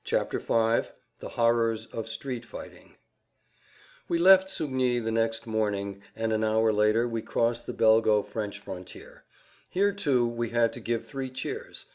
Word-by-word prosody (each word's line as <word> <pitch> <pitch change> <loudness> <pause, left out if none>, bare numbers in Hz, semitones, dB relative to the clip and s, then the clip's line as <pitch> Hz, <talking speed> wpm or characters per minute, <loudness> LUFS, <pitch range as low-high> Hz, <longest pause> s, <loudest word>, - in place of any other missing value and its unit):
[Pg - - -1
38] 115 0 +2
V - - -17 0.3
THE - - -7
HORRORS 115 -1 +1
OF 115 -1 -4
STREET 125 +1 -5
FIGHTING 120 - -11 1.1
We 170 - +2
left 190 +2 +7
Sugny 130 -8 0
the 115 -1 -2
next 115 0 0
morning, 100 -3 -2
and 110 0 -1
an 110 0 0
hour 110 0 +2
later 105 +3 +3
we 115 -1 -3
crossed 115 +1 -1
the - - -4
Belgo 110 -2 +4
French 105 -3 -5
frontier. 95 -2 -10 0.4
Here, 200 +2 +2
too, 140 -11 +1
we 120 -1 -3
had 115 0 +2
to - - -7
give 115 0 -2
three 135 -2 -5
cheers. 420 - -6
115 Hz, 160 wpm, -27 LUFS, 110-125 Hz, 1.1 s, left